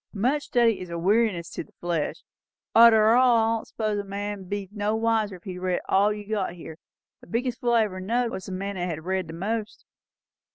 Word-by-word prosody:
"'Much 255 +8 +1
study 235 -3 +2
is 180 - -7
a 170 - -4
weariness 190 -1 +1
to - - -5
the - - -24
flesh.' 170 -3 -3 0.5
Arter 225 -1 +7
all, 245 -1 +5
I 225 0 +2
don't - - -12
suppose 215 -2 -2
a - - -3
man'd 200 -1 -5
be 200 -1 -3
no 210 +1 -1
wiser 220 -3 0
if 175 - -15
he'd 185 -2 -6
read 185 -1 0
all 200 +2 +3
you've 210 0 -7
got 200 -5 -1
here. 165 -2 -10 0.4
The - - -17
biggest 240 +1 -2
fool 240 -1 +1
I 230 -1 +5
ever 185 -3 -4
knowed, 230 +5 0
was 190 - -6
the - - -6
man 195 +1 -4
that 175 0 -2
had 160 -1 -5
read 185 -1 -1
the 165 - -8
most." 210 +5 -4
205 Hz, 220 wpm, -25 LUFS, 185-225 Hz, 0.5 s, Arter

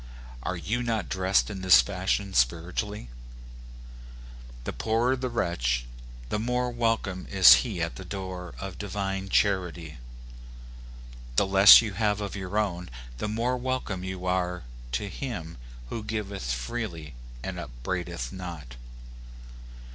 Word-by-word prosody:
Are 90 +8 -3
you 110 +8 -2
not 115 -5 -1
dressed 95 +2 +2
in 95 -2 -6
this 95 -1 +8
fashion 95 0 0
spiritually? 85 - 0 1.5
The - - -4
poorer 115 +4 +1
the 130 0 -3
wretch, 65 - 0 0.4
the 105 - -1
more 125 +2 0
welcome 115 -6 -1
is 95 -2 +9
he 100 -9 -3
at 85 - -4
the 95 - -7
door 95 -1 -6
of 95 -1 -7
divine 95 -1 -3
charity. 90 -7 0 1.4
The 100 - +4
less 95 +3 +9
you 105 -3 -4
have 105 -1 +1
of 100 -1 -4
your 95 +1 -4
own, 90 -4 -1 0.3
the 105 - -2
more 115 +4 0
welcome 125 -7 -3
you 95 -1 -5
are 90 -2 -1 0.3
to 100 - -1
him 95 - -6 0.3
who 115 - -4
giveth 100 - -3
freely 80 - -4 0.3
and - - -4
upbraideth - - -4
not. 85 -9 -7
95 Hz, 130 wpm, -27 LUFS, 90-110 Hz, 1.5 s, is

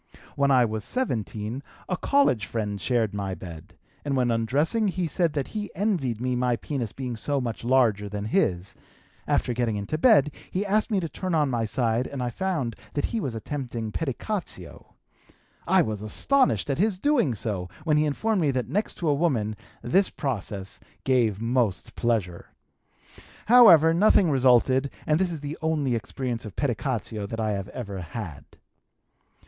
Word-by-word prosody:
When 140 0 +2
I 130 -3 +5
was 110 -1 -3
17 115 - -3 0.3
a 185 - 0
college 180 - +2
friend 105 -2 -3
shared 115 -5 +1
my 100 -2 -3
bed, 85 -4 -11 0.3
and 140 -2 -1
when 125 -2 +2
undressing 145 - +1
he 185 -2 -1
said 165 0 0
that 140 -3 -2
he 210 -1 -4
envied 170 - 0
me 125 +1 -1
my 125 -1 +1
penis 120 -4 -4
being 125 -3 -5
so 140 +5 -1
much 120 -3 -4
larger 115 -5 +2
than 105 0 -4
his; 100 - 0 0.5
after 125 - +1
getting 120 -2 0
into 105 +10 -3
bed, 155 - +5 0.2
he 195 +3 -2
asked 215 +3 +1
me 205 -3 +1
to 165 - -2
turn 180 +3 -3
on 150 -3 +2
my 115 -2 0
side 115 +1 0
and 135 -3 -4
I 120 - -2
found 155 - -2 0.2
that 145 - 0
he 230 - 0
was 130 - -3
attempting 120 -2 -4
pedicatio. 150 - -5 0.7
I - - +5
was 105 -2 -4
astonished 255 - +2
at 140 - -2
his 205 -1 +2
doing 240 - +2
so 100 -4 -3
when 150 -3 +2
he 150 - +3
informed 200 +7 0
me 150 - +2
that 130 -2 -1
next 210 +3 -1
to 170 - -3
a 150 - +4
woman 130 -9 0 0.3
this 190 +11 +3
process 100 -7 -4 0.2
gave 120 -6 +2
most 115 -4 -1
pleasure. 105 -8 -1 1.0
However, 175 -10 +8
nothing 185 -1 +4
resulted 130 +1 +4 0.2
and 150 +1 +2
this 185 -2 +1
is 160 -4 -6
the 145 +1 -6
only 155 -5 0
experience 120 +1 -3
of 105 - -9
pedicatio 115 -5 -2
that 115 +2 -5
I 110 -1 0
have 100 -2 -3
ever 100 -6 -6
had. 85 - -7
130 Hz, 170 wpm, -26 LUFS, 110-160 Hz, 1.0 s, However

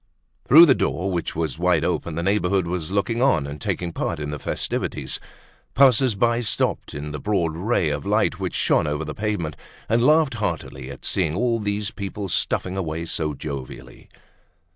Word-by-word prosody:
Through 160 +6 +10
the 140 - +6
door, 95 -5 -1
which 85 -2 -3
was 80 -6 -2
wide - - +2
open, 85 - -2
the 85 - -2
neighborhood 95 -1 +1
was 85 -1 -3
looking 105 +4 0
on 130 - +3
and 70 0 -7
taking 90 -1 -2
part 85 - -2
in 75 -1 -4
the 75 - -5
festivities. - - -3 0.6
Passers 130 -2 +5
by 115 +3 +2
stopped 110 -9 -1
in 75 +1 -5
the 75 - -5
broad 85 -4 0
ray 90 -2 +1
of 70 -1 -3
light - - +1
which - - -3
shone - - +2
over 75 +1 -2
the 75 - -5
pavement, 105 -7 -2 0.3
and 115 +2 +2
laughed 150 0 +4
heartily 80 - -4
at 70 - -10
seeing 80 0 0
all 115 +2 +1
these 105 0 -2
people 100 -1 -5
stuffing 90 +1 0
away 85 -2 -3
so 75 -2 -2
jovially. 65 -3 -8
90 Hz, 180 wpm, -23 LUFS, 75-110 Hz, 0.6 s, Through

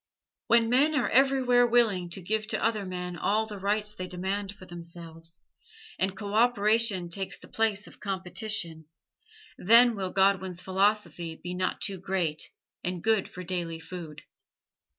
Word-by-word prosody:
When 230 0 +5
men 280 +6 +3
are 270 - +1
everywhere 255 -2 +4
willing 220 -7 +3
to 180 +2 -7
give 215 +4 -1
to - - -2
other 215 -3 0
men 180 -1 -4
all 215 +5 +1
the 210 -2 -8
rights 210 +2 -1
they 185 -3 -6
demand 190 +2 -3
for 200 -2 -13
themselves, 165 -1 -10 0.6
and 190 0 0
co 205 0 -5
operation 220 -4 +3
takes 195 +2 -3
the - - -14
place 215 -2 0
of - - -14
competition, 190 -4 -3 0.7
then 230 +4 +6
will 190 -2 -3
Godwin's 190 -2 +2
philosophy 190 -3 0
be 180 +1 -4
not 185 0 -2
too 195 -2 -2
great 175 -5 -2 0.3
and 180 -1 -3
good 220 -2 +2
for 180 - -8
daily 170 -2 -3
food. 165 -3 -9
195 Hz, 150 wpm, -28 LUFS, 180-220 Hz, 0.7 s, then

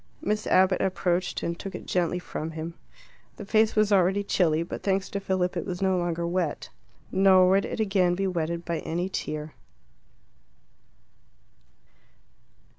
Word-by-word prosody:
Miss 210 +1 -2
Abbott 185 0 +4
approached, 180 -1 -1
and 170 0 -3
took 195 - -6
it - - -8
gently 180 -1 0
from 160 -3 -5
him. 165 +2 -5 0.6
The 210 - -7
face 215 +1 +2
was 215 -1 +3
already 195 +1 +3
chilly, 165 -5 +1
but 170 - -7
thanks 195 -1 0
to 200 - -2
Philip 185 -2 -1
it - - -2
was 180 -2 -5
no 190 -1 +2
longer 170 -1 -1
wet. 170 -3 -2 0.4
Nor 190 -1 +5
would 195 +1 +3
it - - -5
again 190 -4 +2
be 195 +2 -1
wetted 170 -2 -2
by 170 -1 -2
any 175 +3 -3
tear. 155 -4 -4
185 Hz, 150 wpm, -26 LUFS, 170-195 Hz, 0.6 s, Nor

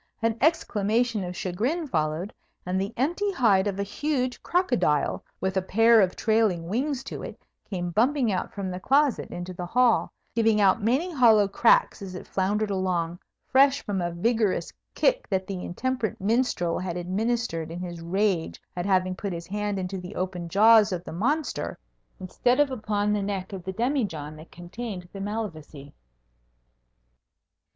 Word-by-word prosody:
An 230 -1 +2
exclamation 230 - +1
of 180 0 -6
chagrin 240 - -1
followed, 160 - -2 0.3
and 185 +1 -1
the 200 +2 -3
empty 350 - 0
hide 210 - +3
of 195 -1 -2
a - - +1
huge 255 +4 -2
crocodile, 245 - +1 0.2
with 190 0 -1
a - - +3
pair 225 +4 +5
of 185 -2 +1
trailing 215 -7 +1
wings 260 - -1
to - - -7
it, - - -8 0.3
came 175 -3 -3
bumping 245 - +2
out 185 - -2
from 195 -2 -4
the 180 - -5
closet 275 +4 +2
into 175 +1 -6
the 180 0 -6
hall, 245 +3 +3 0.2
giving 225 -2 +3
out 200 +2 +4
many 270 - +1
hollow 225 -7 +5
cracks 220 +2 +3
as 190 -2 -7
it - - -7
floundered 205 +2 0
along, 180 -3 -1 0.3
fresh 275 +1 +4
from 195 -3 -1
a 175 - -1
vigourous 205 -1 0 0.2
kick - - +1
that 190 -2 0
the 185 -2 -5
intemperate 250 +3 -2
minstrel 205 -5 0
had 180 -1 -4
administered 185 -2 -2
in 170 +2 -6
his 175 -2 -6
rage 185 0 0 0.2
at 175 +2 -3
having 185 -1 +2
put 200 +1 -4
his 170 0 -6
hand 205 +2 -2
into 190 0 -3
the 180 +3 -9
open 180 -2 -3
jaws 215 +3 +6
of 175 -2 -3
the - - -8
monster 280 - -1 0.4
instead 245 +8 0
of 290 -2 +3
upon 210 -3 -1
the 210 - 0
neck 195 -1 -4
of 190 -2 -6
the 190 - -4
demijohn 205 - -2
that 155 +2 -13
contained 180 +1 -7
the 195 - -6
Malvoisie. 160 -9 -6
200 Hz, 165 wpm, -26 LUFS, 180-235 Hz, 0.4 s, jaws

